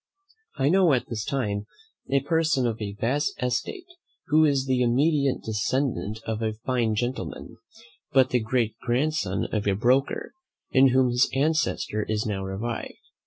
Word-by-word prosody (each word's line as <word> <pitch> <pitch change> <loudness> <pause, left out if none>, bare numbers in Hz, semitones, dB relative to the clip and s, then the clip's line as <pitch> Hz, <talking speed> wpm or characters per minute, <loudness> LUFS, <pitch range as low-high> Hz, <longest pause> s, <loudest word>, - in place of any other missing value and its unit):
I 135 0 +2
know 180 -3 +4
at 125 - -1
this 110 -3 -3
time 105 -7 -2 0.4
a 135 +1 +2
person 155 -2 +1
of 115 -2 -2
a 100 -1 -4
vast 135 +8 -1
estate, 125 - -2 0.4
who 155 +1 +5
is 140 -3 +2
the 130 -1 +1
immediate 140 +3 +2
descendant 110 0 -1
of 110 0 -3
a 110 -1 -1
fine 120 -4 +1
gentleman, 120 0 -4 0.5
but 130 -1 +4
the 125 - +3
great 115 0 0
grandson 125 -5 0
of 105 -2 -1
a 100 - +3
broker, 125 +6 +1 0.4
in 135 0 +6
whom 130 0 +3
his 125 +2 +3
ancestor 145 -7 0
is 110 -1 -1
now 100 -3 -2
revived. 105 +5 -4
125 Hz, 155 wpm, -25 LUFS, 110-140 Hz, 0.5 s, in